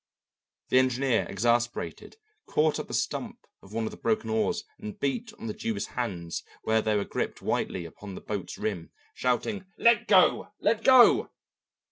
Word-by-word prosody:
The 130 - +5
engineer, 130 -1 +1
exasperated, 120 - -1 0.3
caught 155 0 +2
up - - -5
the - - -8
stump - - -3 0.2
of 95 - -16
one 115 +1 -2
of - - -3
the - - -10
broken 220 0 -1
oars 220 -1 0 0.2
and 210 -1 -8
beat 220 - -2
on - - -9
the 110 - -3
Jew's 105 -2 -3
hands 90 -9 -3 0.2
where 110 0 +2
they 110 0 +1
were 100 - 0
gripped - - -4
whitely 90 -2 -1
upon 95 +4 -9
the - - -8
boat's 100 -3 -5
rim, 90 -7 -3 0.2
shouting, 185 - -1
"Let 235 -1 +4
go! 185 -3 +4
let 225 0 +1
go!" 260 -2 +7
125 Hz, 165 wpm, -28 LUFS, -, 0.3 s, go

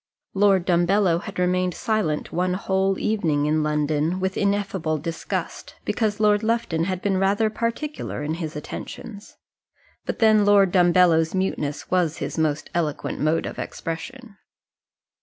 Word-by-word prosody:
Lord 195 -2 +3
Dumbello 175 0 +3
had 200 - -8
remained 180 0 +1
silent 210 -9 -1
one 180 +1 0
whole 190 0 0
evening 160 -9 0
in 155 +1 +1
London 150 +3 0
with 190 0 -1
ineffable 200 -5 0
disgust, 165 +2 -5
because 215 -2 -1
Lord 210 -1 +3
Lufton 220 -8 0
had 185 -1 -3
been 195 -2 +1
rather 205 +3 +2
particular 235 - -3
in 150 +2 -2
his 155 -2 -4
attentions; 205 +7 -8 0.7
but - - -2
then 215 -2 +5
Lord 200 -2 +5
Dumbello's 175 -2 +4
muteness 155 -6 -2
was 175 -4 +1
his - - -4
most 155 -2 0
eloquent 155 -4 -2
mode 155 +2 +1
of - - -6
expression. 210 +7 -6
185 Hz, 140 wpm, -23 LUFS, 160-205 Hz, 0.7 s, then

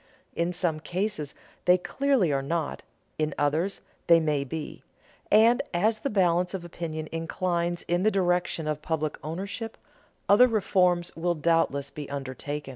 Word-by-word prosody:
In 170 +1 0
some 170 -3 -1
cases 170 -2 -3 0.3
they 180 0 +6
clearly 250 - +1
are 135 - +1
not, 160 +2 -2 0.4
in 155 -1 0
others 155 +7 0 0.3
they 170 -1 +7
may 150 -3 0
be; 150 +3 -6 0.5
and 225 +3 +6
as 215 +5 +2
the 275 - -2
balance 180 -2 +2
of 175 -2 -6
opinion 160 -2 -5
inclines 170 +1 -1
in 175 +1 +1
the 215 - +4
direction 180 -4 0
of 150 -1 -2
public 155 -1 -2
ownership, 200 +8 -5 0.5
other 210 +5 +7
reforms 180 -6 +1
will 175 +1 0
doubtless 155 -3 +1
be 150 -2 -7
undertaken. 140 +1 -5
170 Hz, 145 wpm, -27 LUFS, 155-185 Hz, 0.5 s, they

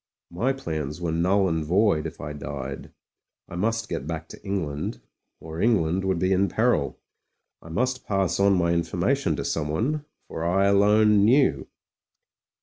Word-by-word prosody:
My 115 +10 0
plans 80 - -4
were 85 -2 -2
null 95 +4 +2
and 80 -3 -1
void 90 0 +2
if - - -10
I 75 +1 -6
died; 75 - -6 0.6
I - - -9
must 115 +5 -1
get 70 - -4
back 80 -1 -5
to - - -12
England 80 -8 -3 0.2
— - - -55
or 80 +2 -7
Eng 115 -2 +4
land 90 +4 -1
would 95 -2 +1
be 95 +2 +1
in 95 +1 +2
peril. 110 - +1 0.6
I 80 - -13
must 125 +9 -2
pass 95 -2 0
on 100 0 +4
my 85 -1 +2
informa 85 0 +1
tion - - -1
to - - -4
someone 110 - -1
— - - -46
for 80 - -5
I 95 +4 +2
alone 105 +1 +4
knew. 110 - +3
95 Hz, 175 wpm, -25 LUFS, 80-105 Hz, 0.6 s, Eng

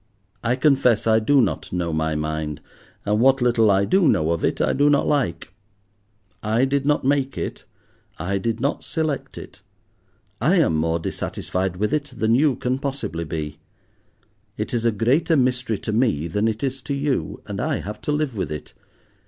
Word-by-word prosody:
I 120 +1 +2
confess 130 -4 +3
I 110 0 +4
do 135 +5 +4
not 85 -9 -3
know 85 -2 -2
my 80 0 0
mind, 75 -1 -3 0.5
and 105 +1 +1
what 135 +2 +4
little 120 -3 +3
I 100 0 +3
do 185 - +3
know 80 - +2
of 85 - -1
it - - 0
I - - +2
do 145 +1 +3
not 145 -1 +3
like. 95 - -1 0.9
I 110 +4 +2
did 140 +1 0
not 150 -3 +2
make 135 -1 +1
it, - - -5 0.5
I 100 +4 -2
did 115 +3 -2
not 140 +4 -1
select 155 -4 -3
it. - - -11 0.8
I - - +3
am 80 - +3
more 80 +1 +1
dissatisfied 90 +2 -3
with 105 +6 -1
it 145 -3 -2
than 110 +1 +2
you 140 +1 +3
can 125 +2 -2
possibly 135 - -3
be. 80 -1 -5 1.0
It 105 - -3
is 120 -1 0
a 115 - +4
greater 130 - +2
mystery 125 -4 +1
to 110 - -4
me 110 - +1
than 105 +6 0
it 110 +2 -2
is 135 -1 -2
to 140 - -3
you, 140 - -1
and - - -4
I - - 0
have 105 +2 -7
to - - -2
live 150 -4 -1
with 95 - -3
it. 75 - -7
115 Hz, 185 wpm, -22 LUFS, 90-135 Hz, 1.0 s, I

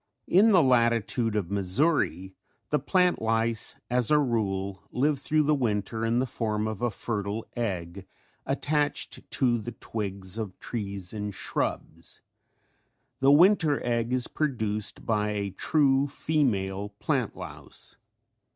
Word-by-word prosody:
In 200 +5 +5
the 185 -6 +6
latitude 115 -2 +2
of 100 -4 -2
Missouri 95 - +1 0.4
the 150 - +3
plant 180 -2 +2
lice 115 0 0
as 125 -1 +1
a 150 - +5
rule 100 -8 -1
live 140 +2 +1
thru 155 +2 +2
the 150 +1 +3
winter 110 -4 -1
in 115 +1 +1
the 130 - +2
form 110 -3 -2
of 110 0 -5
a 120 - +2
fertile 105 -1 -3
egg 95 -5 -4 0.4
attached 145 +1 -1
to 120 -3 +2
the 120 +2 -6
twigs 100 -2 -5
of 100 -5 -5
trees 100 -5 -4
and 105 -2 -4
shrubs. - - -1 1.0
The 135 +1 +5
winter 160 -2 +5
egg 120 -1 0
is 125 -1 +1
produced 110 -8 -2
by 105 -2 0
a 100 -1 -2
true 140 - +2
female 105 -10 0
plant - - -1
louse. - - -6
115 Hz, 135 wpm, -27 LUFS, 100-135 Hz, 1.0 s, the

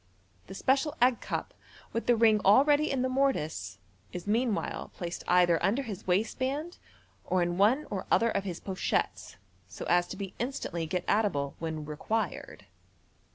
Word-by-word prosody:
The 190 - -9
special 270 +7 +1
egg 250 0 +3
cup, - - -4 0.4
with 230 - -3
the 240 - +5
ring 220 -2 +4
already 290 +9 +5
in 260 -2 0
the - - +1
mortice, 160 - -1 0.3
is 180 - -6
meanwhile 220 +1 -1
placed 175 -2 -5
either 175 -2 +4
under 235 +8 +1
his 210 -6 -7
waistband, 260 - -1 0.4
or 185 -1 +1
in 175 +1 -2
one 245 +9 +4
or 195 -2 -4
other 230 0 +3
of 200 - -1
his 180 -4 -5
pochettes, 190 - -2 0.3
so 95 - -8
as 175 0 +3
to 190 - -7
be 195 -2 -6
in 240 - 0
stantly 170 - -4
get 180 0 -2
at 215 +1 +3
able 140 -8 -2
when 160 -2 -4
required. 160 +9 -3
205 Hz, 165 wpm, -29 LUFS, 175-255 Hz, 0.4 s, the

